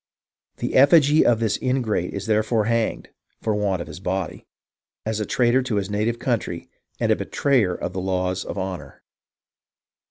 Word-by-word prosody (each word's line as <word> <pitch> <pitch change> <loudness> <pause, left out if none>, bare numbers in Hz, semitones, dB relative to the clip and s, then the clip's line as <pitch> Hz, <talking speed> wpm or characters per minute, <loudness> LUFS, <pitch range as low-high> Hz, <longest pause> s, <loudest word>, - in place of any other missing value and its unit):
"The - - -3
effigy 145 +2 +6
of 115 -2 +3
this 110 -3 0
ingrate 125 -8 0
is 100 0 -5
therefore 110 0 +1
hanged 115 0 -1 0.3
(for 110 - -1
want 100 -4 0
of - - -15
his 75 - -9
body) 95 -2 -4 0.6
as 110 0 -1
a 105 - -2
traitor 125 +1 +3
to 125 -4 -2
his 100 0 -2
native 110 +3 0
country 115 -9 -3 0.3
and - - +1
a - - +5
betrayer 120 -11 +1
of 90 - -5
the 95 - -3
laws 95 0 -1
of - - -6
honour. 95 -1 -6
105 Hz, 165 wpm, -23 LUFS, 95-120 Hz, 0.6 s, effigy